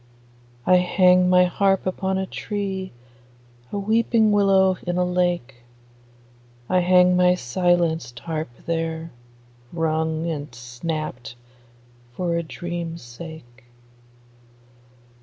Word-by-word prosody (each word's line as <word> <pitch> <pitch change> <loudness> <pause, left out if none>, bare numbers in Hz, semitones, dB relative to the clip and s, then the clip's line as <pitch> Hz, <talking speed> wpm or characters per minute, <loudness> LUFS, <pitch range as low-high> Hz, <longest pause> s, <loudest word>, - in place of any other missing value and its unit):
I 185 - +6
hang 180 0 +4
my 180 0 +6
harp 195 +1 +1
upon 190 +1 -1
a 190 - -1
tree, 195 -1 -4 0.8
A - - -3
weeping 220 +1 +2
willow 195 -2 +4
in 175 0 -1
a 180 - +2
lake; 175 -8 -1 1.1
I 185 - +2
hang 180 0 +5
my 180 0 +4
silenced 165 -3 0
harp 160 -3 -4 0.2
there, 165 0 -3 0.6
wrung 160 -1 -1
and 150 -4 -4
snapt 125 +1 -5 0.8
For 170 +4 -1
a 170 - 0
dream's 170 0 -6
sake. 120 -1 -11
175 Hz, 100 wpm, -23 LUFS, 160-185 Hz, 1.1 s, I